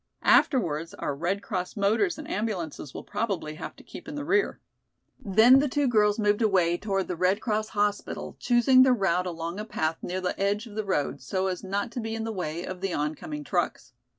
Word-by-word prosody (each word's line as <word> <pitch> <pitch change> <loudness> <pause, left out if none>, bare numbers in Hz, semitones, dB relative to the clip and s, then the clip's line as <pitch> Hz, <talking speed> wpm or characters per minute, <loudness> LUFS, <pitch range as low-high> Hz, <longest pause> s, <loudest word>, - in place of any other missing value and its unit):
Afterwards 170 - +3
our 145 - -3
Red 180 +7 -2
Cross 185 0 -4
motors 215 - +2
and 305 -1 -8
ambulances 185 - -3
will - - -8
probably 200 -7 -3
have 155 - -7
to - - -16
keep - - -11
in 295 - -6
the 290 -1 -4
rear." 395 +5 +1 0.6
Then 220 +7 +6
the 290 - +2
two 285 +1 +1
girls 210 -3 +3
moved 210 0 +2
away 185 -6 +3
toward 195 -2 -1
the 180 - -3
Red 185 +4 +2
Cross 215 -1 -1
hospital 205 0 -1
choosing 255 +1 +5
their 255 -1 +6
route 180 -4 +1
along 170 +2 -4
a - - -3
path 160 -7 -2
near 185 +1 -3
the 180 -1 -3
edge 200 +3 0
of 225 - -11
the 215 +1 -2
road, 145 -7 -1
so 185 +9 -2
as 185 0 -2
not 200 +4 -2
to 245 - -4
be 225 -1 -3
in 225 - -3
the 225 - -3
way 170 -3 -4
of 185 -1 -7
the 195 -2 -1
oncoming 150 0 -3
trucks. 170 -4 -2
200 Hz, 210 wpm, -27 LUFS, 175-225 Hz, 0.6 s, Then